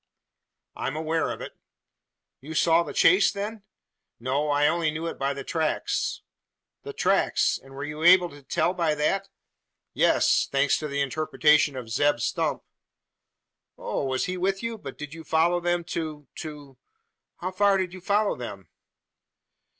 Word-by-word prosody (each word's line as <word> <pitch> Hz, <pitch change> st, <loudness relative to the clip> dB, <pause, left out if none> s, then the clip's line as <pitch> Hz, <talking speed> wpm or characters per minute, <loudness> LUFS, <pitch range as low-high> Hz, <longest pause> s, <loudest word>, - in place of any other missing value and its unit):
"I -, -, -3 dB
am 135 Hz, -, -3 dB
aware 160 Hz, +1 st, -1 dB
of -, -, -5 dB
it." -, -, -6 dB, 0.9 s
"You 155 Hz, +4 st, -8 dB
saw 165 Hz, +1 st, +4 dB
the -, -, -5 dB
chase 185 Hz, +3 st, +5 dB
then?" 210 Hz, +2 st, -5 dB, 0.6 s
"No. 135 Hz, +5 st, -1 dB
I 145 Hz, 0 st, +3 dB
only 170 Hz, -1 st, +1 dB
knew 155 Hz, +2 st, -4 dB
it 165 Hz, -, -5 dB
by 140 Hz, +1 st, 0 dB
the 140 Hz, -, -6 dB
tracks." 160 Hz, 0 st, -1 dB, 0.6 s
"The -, -, -7 dB
tracks! -, -, +1 dB
And 135 Hz, 0 st, -15 dB
were 140 Hz, -, -5 dB
you 150 Hz, +1 st, -6 dB
able 180 Hz, +1 st, +7 dB
to 145 Hz, 0 st, -13 dB
tell 170 Hz, +5 st, 0 dB
by 165 Hz, -4 st, 0 dB
that?" 195 Hz, +6 st, 0 dB, 0.6 s
"Yes -, -, +3 dB
thanks 140 Hz, 0 st, +2 dB
to 155 Hz, -, -4 dB
the 140 Hz, -1 st, -2 dB
interpretation 150 Hz, 0 st, +2 dB
of 125 Hz, -3 st, -6 dB
Zeb 145 Hz, +5 st, +2 dB
Stump." -, -, -1 dB, 1.1 s
"Oh! 135 Hz, -, -3 dB
he 180 Hz, +7 st, -1 dB
was -, -, -7 dB
with 195 Hz, -, -13 dB
you? 230 Hz, -1 st, -4 dB
But -, -, -9 dB
did 150 Hz, 0 st, -7 dB
you 165 Hz, 0 st, -9 dB
follow 165 Hz, +3 st, +2 dB
them 175 Hz, 0 st, 0 dB
to 155 Hz, -3 st, -4 dB
to 145 Hz, -4 st, -9 dB, 0.6 s
how 185 Hz, +2 st, -3 dB
far 200 Hz, +1 st, +3 dB
did 185 Hz, -2 st, -2 dB
you 185 Hz, -, -9 dB
follow 205 Hz, +3 st, +1 dB
them?" 100 Hz, -6 st, -8 dB
155 Hz, 165 wpm, -26 LUFS, 145-175 Hz, 1.1 s, able